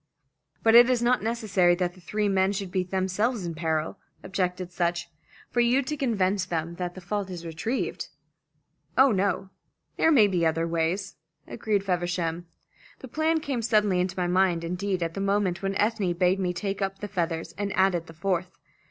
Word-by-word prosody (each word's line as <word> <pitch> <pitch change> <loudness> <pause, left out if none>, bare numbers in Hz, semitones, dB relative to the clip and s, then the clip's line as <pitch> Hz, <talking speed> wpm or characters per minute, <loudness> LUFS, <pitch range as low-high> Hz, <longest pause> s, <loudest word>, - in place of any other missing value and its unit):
"But 225 - +5
it 240 +1 +8
is 245 -2 +2
not 250 +1 +3
necessary 205 -6 +2
that 175 -1 -1
the 185 - -17
three 210 +4 -1
men 195 0 +2
should 195 -2 -4
be 185 - +1
themselves 190 +4 -1
in 170 - -3
peril," 160 +2 -2 0.2
objected 180 -1 -2
Sutch, 175 -1 -1 0.4
"for 245 - 0
you 240 +3 +3
to 300 +4 -3
convince 205 -8 +1
them 170 -2 -3
that 175 -1 -4
the 185 - -9
fault 195 +2 -3
is 175 -2 -7
retrieved." 170 +10 -3 0.9
"Oh, 265 0 +6
no. 195 -1 0 0.5
There 325 - +4
may 245 -9 +7
be 185 -4 0
other 165 +1 +1
ways," 165 +3 -1 0.3
agreed 205 -3 -1
Feversham. 175 -2 -2 0.5
"The 260 - -11
plan 315 +4 +1
came 275 -5 -2
suddenly 210 -4 +2
into 180 0 -1
my 180 - +1
mind, 180 -1 +2
indeed 180 +1 -2
at 165 0 -3
the 195 - -4
moment 195 -2 0
when 195 0 -2
Ethne 205 -3 +1
bade 180 +2 +2
me 180 -2 0
take 195 +3 -3
up 195 0 -1
the 205 - -6
feathers, 170 -3 -3
and 200 -1 -1
added 190 -3 +2
the 165 - -11
fourth. 180 +1 -2
190 Hz, 185 wpm, -26 LUFS, 175-210 Hz, 0.9 s, it